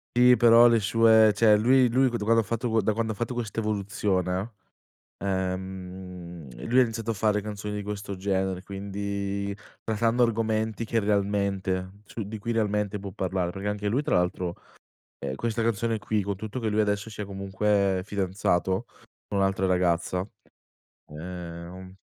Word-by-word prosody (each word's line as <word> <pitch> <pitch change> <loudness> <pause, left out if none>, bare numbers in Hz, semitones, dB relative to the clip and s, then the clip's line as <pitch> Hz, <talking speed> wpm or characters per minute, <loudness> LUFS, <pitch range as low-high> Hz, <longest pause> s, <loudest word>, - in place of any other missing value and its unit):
Sì, 125 0 +7
però 120 0 +7
le 115 -1 +4
sue, 110 +1 +5
cioè 105 0 +6
lui 125 +4 +5
lui 130 +3 +3
quan 120 - -2
quando 115 +2 +3
ha - - -5
fatto 115 +1 0
da 105 +2 +1
quando 110 0 -1
ha - - -5
fatto 120 +3 -3
questa 115 -2 -3
evoluzione, 100 -1 -1 0.7
ehm, 90 -6 -5
lui 125 +2 +4
ha - - +8
iniziato 115 -1 -3
a - - -1
fare 105 0 +1
canzoni 105 0 -5
di 105 - -3
questo 100 -1 -5
genere, 95 -1 -1
quindi 100 0 -4 0.3
trattando 115 +2 +1
argomenti 110 -1 0
che 115 0 0
realmente 100 -2 0
su 110 +1 -6
di 110 +1 -5
cui 115 +3 -3
realmente 105 -2 0
può 100 -1 -7
parlare, 95 -2 -1
perché 100 +2 -4
anche 105 0 -3
lui 125 +7 +1
tra - - +1
l'altro, 90 0 0 0.6
ehm, 65 - -4
questa 115 - -2
canzone 115 0 0
qui, 105 0 -1
con 100 0 -2
tutto 110 +5 -5
che 115 -2 -1
lui 105 +1 +2
adesso 105 +1 -1
sia 105 -1 -6
comunque 100 0 0
fidanzato 95 0 0 0.4
con 100 - -1
un'altra 95 -1 +1
ragazza, 90 0 +1 0.8
ehm 90 +3 -8
100 Hz, 160 wpm, -27 LUFS, 95-110 Hz, 0.8 s, ha